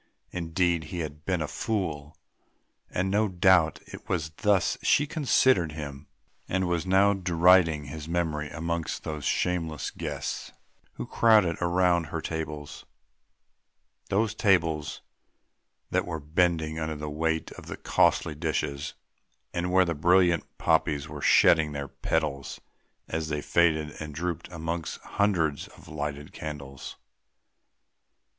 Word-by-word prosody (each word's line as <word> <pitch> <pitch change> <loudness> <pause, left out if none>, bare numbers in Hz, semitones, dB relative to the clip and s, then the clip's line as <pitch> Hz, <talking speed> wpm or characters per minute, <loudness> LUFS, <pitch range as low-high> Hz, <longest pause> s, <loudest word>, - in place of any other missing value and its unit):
Indeed 85 -1 0
he 90 +2 -4
had 75 -1 -7
been 90 -4 0
a - - -3
fool! 80 -7 -3 0.7
And 95 +1 -1
no 105 +2 +3
doubt 90 -3 +4
it - - -12
was 80 -3 -1
thus 100 -4 +2
she 145 - +3
considered 130 - +2
him, 70 -2 -7 0.4
and 95 0 0
was 85 +1 -1
now 95 +2 +5
deriding 90 -4 +4
his 75 +2 -7
memory 80 -3 -1
amongst 85 +1 -3
those 75 -3 -5
shameless 85 -4 -1
guests - - -5 0.4
who - - -6
crowded 105 -8 +4
around 85 -1 +2
her 80 +2 -4
tables; 75 -3 -5 1.3
those 105 +2 +1
tables 80 -8 +1 0.9
that - - +1
were 80 -2 -3
bending 80 +1 0
under 80 0 -2
the 75 0 -5
weight 80 +2 -1
of - - -11
the - - -6
costly - - +2
dishes, 70 -1 -3 0.6
and 90 0 -1
where 95 0 +5
the 85 - -1
brilliant 85 +2 +3
poppies 75 0 +1
were 75 -1 -8
shedding 80 0 +5
their 70 -1 -4
petals 70 -4 -2 0.5
as 80 0 -3
they 75 -1 -1
faded 80 -1 +2
and 75 -2 -6
drooped 85 +1 -4
amongst 80 0 -4
hundreds 85 -8 0
of - - -17
lighted 75 -1 -5
candles. 70 -3 -7
80 Hz, 130 wpm, -27 LUFS, 75-90 Hz, 1.3 s, now